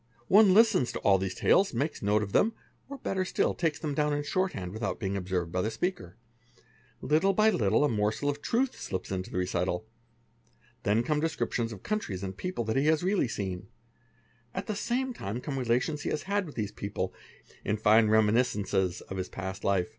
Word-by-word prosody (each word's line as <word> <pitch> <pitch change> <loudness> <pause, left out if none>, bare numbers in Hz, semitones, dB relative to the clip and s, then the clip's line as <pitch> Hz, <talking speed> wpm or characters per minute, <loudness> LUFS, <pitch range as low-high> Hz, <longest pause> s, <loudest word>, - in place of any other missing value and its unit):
| 120 - -32
4 195 - +6
One 210 -3 +7
listens 215 - +5
to - - -3
all 95 -1 +4
these 95 -1 -3
tales, 190 -9 +3
makes 140 +6 -2
a - - -5
note 105 +1 +3
of 100 - -6
them, 225 - +3 0.4
or 280 - -6
better 190 -6 -1
sti 185 - 0
takes 160 -4 -1
them 155 -3 -3
down 150 +1 +1
in 145 - -2
shorthand 140 - -2
without 110 0 -3
being 100 -2 -2
observed 90 -3 -2
by 90 - 0
the 110 - 0
speak 180 +11 -1
2 90 -1 -12 0.9
little 160 +6 +3
by 215 +3 +4
little 110 - +2
a - - +4
morsel 110 +3 0
of 145 0 -1
truth 250 +3 0
slips 95 -1 -4
into 95 -1 -3
the - - -5
recital; 90 +1 -1 1.0
then 105 +3 +2
come 150 +4 0
des 165 +2 +1
ori - - -1
tions 115 -1 -1
of 100 -4 -9
countries 100 - -3
and 95 -1 -4
people 180 - -3
that 110 +3 -1
he 140 +2 +2
has 160 +1 +3
really 190 -6 +2
seen, 95 -4 -4 0.9
at - - -3
the 215 - -3
same 250 +4 -1
i 100 +5 -3
come 135 +1 -4
relations 125 +5 0
he - - -2
has 150 - -2
had 200 -1 -1
with 150 - -10
these 105 -3 -2
people, 100 0 -4 0.5
in 105 - 0
fine 110 +1 +5
reminiscences 105 -4 +2
one 95 -1 -3
past 95 0 -6
life. 100 0 +1
115 Hz, 215 wpm, -29 LUFS, 100-165 Hz, 1.0 s, One